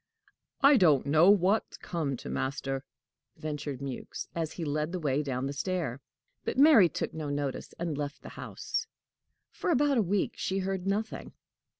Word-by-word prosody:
"I 280 0 +7
don't 155 - +4
know 155 +6 +5
what's 200 +2 +3
come 150 -7 -3
to - - -9
master!" 135 0 -2 0.5
ventured 145 -3 -4
Mewks, 135 -3 -5
as 165 -2 -2
he 170 - -4
led 150 +2 -1
the 185 - -3
way 145 -3 +1
down 130 -3 -2
the 140 - -2
stair. 145 -5 -2 0.4
But - - -3
Mary 270 - +7
took - - -3
no 155 -2 -4
notice, 145 -2 -3
and 170 -3 -2
left 145 0 -5
the - - -8
house. - - -4 0.6
For - - -3
about 290 -4 +3
a - - +5
week 200 0 0
she 190 - -1
heard 190 -1 -2
nothing. 210 +3 -2
160 Hz, 170 wpm, -30 LUFS, 140-195 Hz, 0.6 s, I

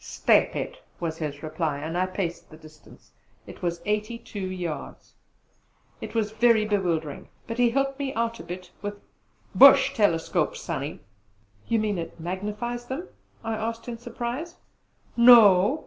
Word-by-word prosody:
"Step - - +2
it!" - - -5 0.2
was 165 -2 -4
his 145 -2 -5
reply. 155 -2 -2
I 175 +3 0
paced 185 -2 -4
the 155 - -13
distance; 155 -1 -17 0.3
it - - -12
was 170 -1 -2
eighty 210 +2 -1
two 230 -3 -9
yards. 175 -6 -6 0.9
It - - -7
was 215 -2 0
very 220 -1 +3
bewildering; 170 -8 -1 0.2
but 230 0 -6
he 245 -1 +5
helped 275 +2 -1
me 275 -1 -2
out 230 0 -1
a - - -8
bit 180 +1 -8
with 205 0 -5 0.5
"Bush 275 0 +8
telescopes, 170 -8 +1
Sonny!" - - -5 0.7
"You 230 - +2
mean 210 -4 -1
it 165 0 -7
magnifies 210 +8 -4
them?" 295 +9 -5 0.3
I 225 - -2
asked 225 +2 -4
in 235 -1 -6
surprise. 245 +8 -5 0.6
"No! 230 0 +7
210 Hz, 150 wpm, -26 LUFS, 175-235 Hz, 0.9 s, Bush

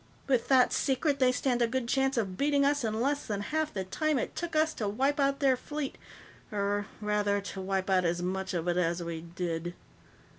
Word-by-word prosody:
With 255 -4 +1
that 260 -2 +5
secret, 280 +1 +1
they 255 -1 +5
stand 250 -1 0
a 235 - +4
good 245 0 -2
chance 270 +1 +1
of 195 -5 -1
beating 280 +3 +2
us 285 -1 +2
in 220 -1 -1
less 285 +4 0
than 205 -2 -2
half 310 +7 -1
the 190 - -3
time 305 +10 0
it - - -3
took 335 -1 -4
us 310 0 +3
to 210 - -3
wipe 270 +8 +1
out 275 0 +1
their 270 -2 +4
fleet 290 +2 -5 0.6
or, 205 0 -1
rather, 210 -1 +1
to 200 -1 -6
wipe 190 0 -1
out 190 -2 +3
as 175 0 0
much 190 +1 -2
of 170 0 -2
it 175 0 +1
as 170 0 0
we 165 -1 -5
did." 170 0 -4
225 Hz, 215 wpm, -30 LUFS, 190-275 Hz, 0.6 s, that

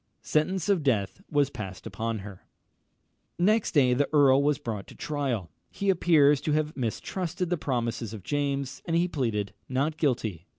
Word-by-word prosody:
Sentence 185 +4 0
of 200 -5 +3
death 120 - 0
was 145 -3 +2
passed 95 -6 -7
upon 110 +2 -3
her. 100 -3 -11 0.9
Next 210 +5 +2
day 130 -5 +5
the 140 +3 +1
earl 140 -3 +5
was 145 -1 +2
brought 105 -4 -5
to - - -13
trial. 130 - -2 0.2
He 200 -1 +1
appears 150 -6 +4
to 150 - 0
have 155 0 0
mistrusted 175 - -3
the 175 - +2
promises 120 -5 -2
of 110 -4 -8
James, 140 +1 -2
and 165 - -1
he 170 +1 +3
pleaded 110 - -2 0.2
not 140 +5 0
guilty. 110 - -1
140 Hz, 165 wpm, -27 LUFS, 115-155 Hz, 0.9 s, day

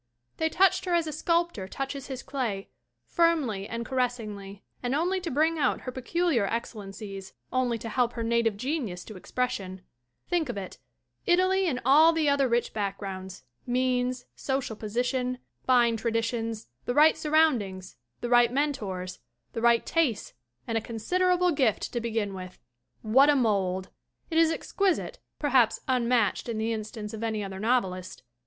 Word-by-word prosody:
They 320 - +1
touched 375 +4 +3
her 355 -1 +1
as 340 -1 +2
a 310 - -3
sculptor 335 - 0
touches 270 +5 -5
his 265 -2 -6
clay, 230 -8 -3 0.4
firmly 290 - +1
and 235 0 -4
caressingly 215 -6 -3 0.2
and 250 +2 -1
only 360 +5 +1
to 345 - -3
bring 315 +3 +2
out 270 -3 +1
her 255 - -5
peculiar 260 - 0
excel 230 0 -3
lences, 195 -1 -8 0.2
only 250 -2 +1
to 225 - -7
help 240 +1 +1
her 230 - -3
native 230 -2 +1
genius 245 - -3
to 215 - -10
expression. 195 -3 -3 0.5
Think 340 -6 0
of 240 - -3
it 190 -2 -7 0.5
Italy 370 +1 +3
and 255 -6 0
all 310 +5 +7
the 320 -2 +1
other 280 -1 +3
rich 235 0 0
backgrounds, 195 -3 -4 0.2
means, 250 0 0
social 265 -4 -2
position, 250 +4 -1 0.3
fine 240 -3 +4
traditions, 230 0 -2 0.2
the 245 - -1
right 310 +2 +7
sur 305 - -5
roundings, 220 - +2 0.3
the 240 - -3
right 240 -1 +5
mentors, 205 -11 -2 0.3
the 225 - -3
right 235 0 +4
tastes 285 -11 0 0.3
and 225 0 0
a - - -10
considerable 360 +11 +1
gift 260 -8 +1
to 240 - -1
begin 220 -3 -2
with! 185 -1 -8 0.4
What 265 +7 +5
a 295 - +5
mold! 195 -7 0 0.4
It 325 - +3
is 330 -1 +5
exquisite, 395 +8 -1 0.2
perhaps 255 -6 +3
unmatched 245 -3 +1
in 230 - -2
the 225 +1 0
instance 215 0 -6
of 220 - -6
any 220 -2 -1
other 190 -1 -6
novelist. 190 - -1
240 Hz, 160 wpm, -28 LUFS, 215-285 Hz, 0.5 s, all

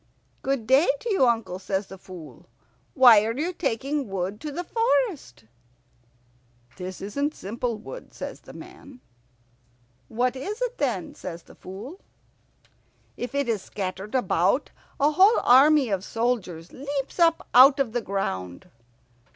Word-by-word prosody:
"Good 270 -4 -1
day 270 - +4
to 470 - -3
you, 380 -11 +4
uncle," 225 -6 -1
says 190 +1 -2
the 190 - -11
Fool. 165 -9 -12 0.5
"Why 240 -5 +8
are 225 +2 -2
you 335 +5 -2
taking 275 - -2
wood 195 +2 -4
to 300 -1 -5
the 350 +5 -4
forest?" 455 - -1 1.3
"This 185 0 -7
isn't 280 +10 -2
simple 230 +3 -4
wood," - - -10
says - - -7
the - - -13
man. 275 -3 -13 1.1
"What 250 - 0
is 405 - -5
it, - - -3
then?" 235 - -2
says 170 -2 -8
the - - -17
Fool. 225 - -10 1.2
"If 250 +3 -6
it 280 -2 0
is 220 -4 0
scattered 195 +3 -5
about, 200 - +1 0.3
a 290 +2 +4
whole 385 +8 +5
army 275 +1 +6
of 195 -2 -1
soldiers 210 -8 -2
leaps 280 +3 -5
up 330 -1 +3
out 270 +3 +8
of 265 -5 0
the 240 +1 -1
ground." 95 - -4
245 Hz, 145 wpm, -25 LUFS, 195-285 Hz, 1.3 s, Why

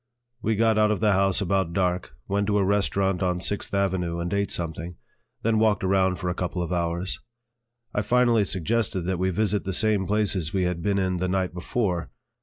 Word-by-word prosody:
We 110 +1 0
got 110 0 +3
out 105 0 +4
of 105 -3 0
the 105 -1 +3
house 95 0 +2
about 95 -3 0
dark, 90 -1 -1
went 100 +1 0
to 105 -1 +2
a 100 - +3
restaurant 95 -1 +1
on 90 -1 0
Sixth 100 +2 -2
Avenue 95 -4 0
and 85 +2 -3
ate 100 0 0
something, 85 +1 -3 0.5
then 110 -1 +2
walked 110 -3 +2
around 95 -1 +2
for 90 - -5
a 90 - 0
couple 90 0 -3
of 85 - -3
hours. 85 +1 -2 0.7
I 105 - +1
finally 120 0 +3
suggested 95 +1 0
that 90 +1 -2
we 95 +1 +1
visit 105 +2 0
the 95 - -3
same 105 -2 +3
places 100 -6 +1
we 95 - +2
had 90 -1 -1
been 100 +2 0
in 95 -2 0
the 90 +1 -1
night 95 -1 -1
before. 90 - -2
95 Hz, 205 wpm, -25 LUFS, 90-105 Hz, 0.7 s, out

